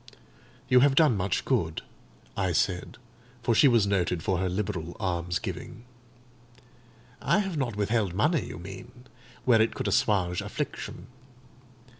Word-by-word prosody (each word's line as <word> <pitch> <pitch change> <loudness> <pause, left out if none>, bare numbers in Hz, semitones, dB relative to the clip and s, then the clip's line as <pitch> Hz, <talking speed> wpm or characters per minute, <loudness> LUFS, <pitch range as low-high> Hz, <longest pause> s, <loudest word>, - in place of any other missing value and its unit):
"You 125 -1 +6
have 135 +1 +4
done 150 -6 +5
much 95 -1 -1
good," - - 0 0.5
I 95 -3 0
said; 90 +2 -1 0.5
for 120 - +2
she 125 - +6
was 115 -5 +4
noted 90 -4 0
for 95 -2 0
her 95 0 0
liberal 90 -3 -3
almsgiving. 90 +4 -3 1.4
"I - - +2
have 195 -4 -1
not 130 -7 -2
withheld 105 -3 0
money, 150 - +1
you - - -7
mean, 110 +8 -10 0.4
where 115 -3 +5
it 110 - +1
could - - -3
assuage 90 -4 +1
affliction. - - -5
105 Hz, 135 wpm, -27 LUFS, 90-120 Hz, 1.4 s, You